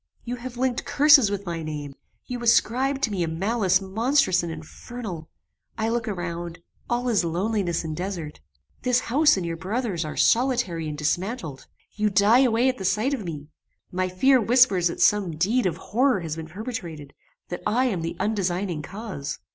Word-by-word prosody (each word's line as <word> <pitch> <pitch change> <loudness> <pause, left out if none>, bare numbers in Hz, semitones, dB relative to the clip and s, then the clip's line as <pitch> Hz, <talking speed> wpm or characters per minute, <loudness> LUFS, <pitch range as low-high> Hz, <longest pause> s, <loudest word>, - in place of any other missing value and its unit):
You 245 +1 -4
have 245 0 -8
linked 255 -1 0
curses 290 -6 +6
with 200 0 -4
my 170 -2 -4
name; 150 -3 -5 0.3
you 245 -1 -5
ascribe 255 +4 +2
to 225 - +1
me 195 -3 -2
a 170 - +1
malice 190 +3 +1
monstrous 220 +1 +2
and 170 -1 -4
infernal. 165 +2 -8 0.5
I 220 0 0
look 230 -1 -1
around; 175 -3 -4 0.3
all 245 +1 0
is 210 -7 +2
loneliness 175 +1 -1
and 155 -1 -4
desert! 175 -4 -5 0.4
This 250 -1 +2
house 295 +1 +3
and 185 - -2
your 165 0 -3
brother's 195 -1 -2
are 155 0 -6
solitary 225 -11 +2
and 150 - -6
dismantled! 160 - -3 0.3
You 210 0 +1
die 205 +5 +5
away 245 -1 +3
at 260 -3 0
the - - -5
sight 215 +8 +1
of 250 -6 -3
me! 150 -3 -7 0.4
My 185 0 -1
fear 255 +8 +4
whispers 225 -6 +4
that 170 - -4
some 195 -6 +3
deed 210 +7 +2
of 175 - -2
horror 245 -1 +1
has 160 -2 -4
been 160 -1 -7
perpetrated; 170 - -7 0.4
that 175 - -5
I 250 +4 +2
am 200 -9 -1
the 165 +1 -4
undesigning 185 -5 -1
cause." 185 -6 -6
200 Hz, 180 wpm, -24 LUFS, 170-240 Hz, 0.5 s, curses